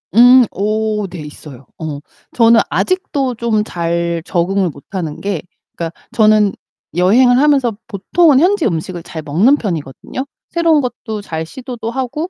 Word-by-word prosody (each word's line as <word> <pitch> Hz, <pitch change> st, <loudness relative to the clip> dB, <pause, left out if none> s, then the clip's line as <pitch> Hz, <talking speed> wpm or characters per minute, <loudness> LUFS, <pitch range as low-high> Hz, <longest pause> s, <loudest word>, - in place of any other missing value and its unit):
음. 245 Hz, +2 st, +7 dB
어 215 Hz, 0 st, -1 dB
네 175 Hz, -1 st, -8 dB
있어요. 150 Hz, -3 st, -11 dB
어 155 Hz, -3 st, -5 dB, 0.3 s
저는 230 Hz, -1 st, +5 dB
아직도 285 Hz, -9 st, -1 dB
좀 220 Hz, -2 st, 0 dB
잘 170 Hz, -3 st, -2 dB
적응을 185 Hz, +2 st, 0 dB
못 140 Hz, -3 st, -12 dB
하는 170 Hz, -6 st, -4 dB
게 195 Hz, -6 st, -2 dB, 0.3 s
그러니까 170 Hz, -1 st, -6 dB
저는 215 Hz, -2 st, +4 dB, 0.4 s
여행을 240 Hz, +8 st, +4 dB
하면서 270 Hz, -5 st, +3 dB
보통은 265 Hz, -, +3 dB
현지 365 Hz, +2 st, +2 dB
음식을 175 Hz, -2 st, -2 dB
잘 160 Hz, -2 st, -7 dB
먹는 180 Hz, -, +3 dB
편이거든요. 175 Hz, -, -5 dB, 0.2 s
새로운 330 Hz, -3 st, +2 dB
것도 220 Hz, -4 st, -5 dB
잘 160 Hz, -5 st, -5 dB
시도도 240 Hz, +4 st, -7 dB
하고 265 Hz, +7 st, -3 dB
215 Hz, 295 characters per minute, -16 LUFS, 170-255 Hz, 0.4 s, 음